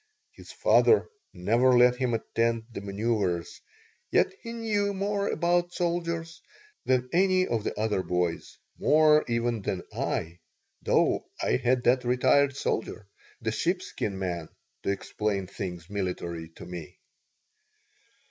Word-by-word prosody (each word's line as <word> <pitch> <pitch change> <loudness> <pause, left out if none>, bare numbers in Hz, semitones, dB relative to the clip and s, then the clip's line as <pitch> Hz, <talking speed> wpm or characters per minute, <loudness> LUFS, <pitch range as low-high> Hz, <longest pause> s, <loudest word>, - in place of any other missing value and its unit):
His - - -13
father 440 - +4 0.2
never 115 +7 +3
let 125 0 +5
him 125 -2 0
attend 115 0 0
the 115 - -6
manoeuvers, 100 -4 -2 0.5
yet - - +3
he 230 - -7
knew 210 -3 -1
more 200 +1 -1
about 175 0 +1
soldiers 170 -1 -2 0.4
than 125 -1 +2
any 185 +1 +4
of 115 - -1
the - - -3
other 105 -3 +1
boys, 90 -2 -2 0.2
more 155 0 +5
even 115 -1 0
than 95 -2 -3
I, 85 +2 -2 0.4
though - - +2 0.2
I - - +2
had 125 0 +1
that 125 +1 +3
retired 135 +3 +3
soldier, 110 -4 -2 0.4
the 110 -1 -1
sheepskin 170 - -2
man, 85 -4 -3 0.3
to - - -3
explain 100 0 -2
things 90 -3 -6
military 90 -4 -4
to - - -10
me. 85 -3 -8
120 Hz, 130 wpm, -27 LUFS, -, 0.5 s, let